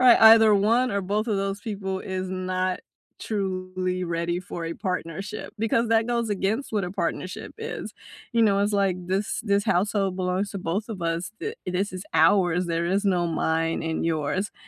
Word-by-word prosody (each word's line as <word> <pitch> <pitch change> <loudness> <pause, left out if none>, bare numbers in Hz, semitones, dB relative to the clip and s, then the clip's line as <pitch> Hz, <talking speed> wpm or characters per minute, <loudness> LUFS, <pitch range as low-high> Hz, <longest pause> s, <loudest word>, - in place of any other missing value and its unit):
Right, 250 -2 +7
either 220 -1 +8
one 230 +5 +3
or 200 - 0
both 205 +4 -1
of 215 - 0
those 195 +1 -2
people 195 -3 -4
is 185 -1 -4
not 185 0 -1 0.4
truly 185 -3 -2
ready 170 0 -1
for 175 -2 -6
a 165 - -4
partnership 185 +3 -4
because 225 +1 +1
that 225 0 +3
goes 235 -2 0
against 205 +6 -1
what 205 -4 +1
a 175 - -4
partnership 180 0 -3
is, 455 +1 -5 0.4
you 235 -1 +1
know, 200 -2 +4
it's 205 +1 +1
like 195 -3 +2
this 195 +2 -1
this 200 -2 +1
household 195 +1 +1
belongs 185 +2 -1
to 200 - -4
both 190 +5 -2
of 205 -6 -6
us. 165 +3 -2
Th 440 +2 -3
this 185 +2 -1
is 185 +1 -6
ours, 180 -3 +4
there 170 0 -1
is 195 +4 +1
no 180 -3 +2
mine 165 0 0
and 160 0 -1
yours, 165 +5 -1
190 Hz, 185 wpm, -25 LUFS, 180-210 Hz, 0.4 s, either